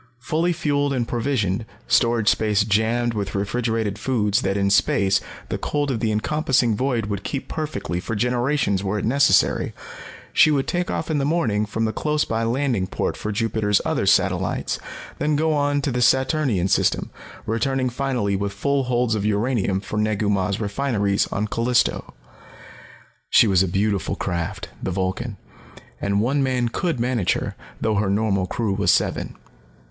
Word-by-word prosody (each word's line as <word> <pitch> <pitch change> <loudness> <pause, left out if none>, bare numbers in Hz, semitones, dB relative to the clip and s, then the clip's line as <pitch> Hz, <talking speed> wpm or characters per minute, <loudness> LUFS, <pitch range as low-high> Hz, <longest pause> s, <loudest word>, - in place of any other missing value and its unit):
Fully 160 +7 0
fueled 145 -4 0
and 120 -3 -1
provisioned, 115 -5 -1 0.2
storage 115 -3 +2
space 105 -2 +3
jammed 110 +3 +1
with 100 -3 -3
refrigerated 110 0 -1
foods 110 -3 +1
that 95 -2 0
in 100 0 +1
space 100 -1 +3 0.3
the - - -3
cold 145 -1 -1
of 120 - -2
the 110 -1 0
encompassing 125 0 +1
void 125 -2 0
would 100 -2 -4
keep 135 - -4
perfectly 150 - -3
for 110 +5 -4
generations 120 -3 0
were 100 +2 -1
it 105 - -2
necessary, 125 -5 +3 0.6
she - - +6
would 140 -3 +1
take 175 0 -1
off 160 - -2
in 150 - +1
the - - 0
morning 115 -9 +1
from 110 +2 -1
the 110 - -1
close 150 0 0
by 115 0 -1
landing 120 -4 0
port - - -2
for 105 - -4
Jupiter's 105 -1 +1
other - - 0
satellites, - - +1 0.4
then 150 0 +1
go 155 +1 +1
on 145 -1 +1
to 140 - 0
the 125 0 -1
Saturnian 130 - +2
system, - - +1 0.3
returning 130 +3 0
finally 125 -5 -1
with 100 0 -2
full 140 +6 0
holds 125 -2 +1
of 105 -2 -1
uranium 105 -2 0
for 105 +2 -6
Negu 105 -1 0
Mah's 100 0 0
refineries 105 -2 0
on 105 +2 -2
Callisto. 115 +3 0 1.1
She - - +6
was 95 -4 +3
a 95 - +2
beautiful 100 0 0
craft, 90 +2 -3
the - - -2
Vulcan, 95 +4 -2 0.6
and 100 0 +1
one 135 +6 +1
man 125 -3 +1
could 165 +1 -2
manage 120 -5 +1
her, - - -4 0.2
though 110 -2 0
her 100 -1 +1
normal 100 -2 +1
crew 110 -1 -1
was 100 +1 0
seven. - - +1
115 Hz, 165 wpm, -22 LUFS, 100-135 Hz, 1.1 s, she